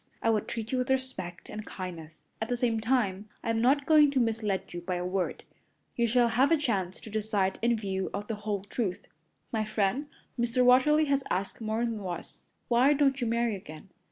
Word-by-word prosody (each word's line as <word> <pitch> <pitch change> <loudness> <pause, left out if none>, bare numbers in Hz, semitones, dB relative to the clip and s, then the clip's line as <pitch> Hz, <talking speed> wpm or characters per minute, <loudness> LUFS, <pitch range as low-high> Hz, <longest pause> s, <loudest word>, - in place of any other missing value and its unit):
I 230 - +4
would 215 -2 0
treat 225 0 -4
you 260 - +1
with 250 - -1
respect 260 -10 -2
and 215 - -6
kindness. 170 -6 -8 0.2
At 220 - -2
the 245 - 0
same 235 -2 +1
time, 215 -4 0
I'm 225 0 0
not 275 +4 +3
going 300 -1 +6
to 275 -1 +1
mislead 220 -4 -1
you 175 - -5
by 180 +1 -2
a 175 0 -2
word. 185 0 -2 0.5
You 235 -1 +2
shall 240 +1 +3
have 255 +6 +3
a 330 - +6
chance 200 -11 -1
to 220 - -10
decide 210 -3 0
in 235 0 +2
view 190 -3 -2
of 205 - -4
the 225 - -2
whole 205 -2 -2
truth. 205 -2 -3 0.5
My 220 -2 0
friend, 215 +6 0 0.3
Mr. 240 +1 +2
Watterly, 300 +5 +5
has 275 -1 +1
asked 195 +4 -2
me 220 - -4
more'n 225 0 -1
once, 180 -3 -7 0.2
'Why 250 +4 +5
don't 275 -2 +2
you 240 - 0
marry 235 -1 +1
again?' 155 -1 -11
225 Hz, 205 wpm, -29 LUFS, 195-250 Hz, 0.5 s, going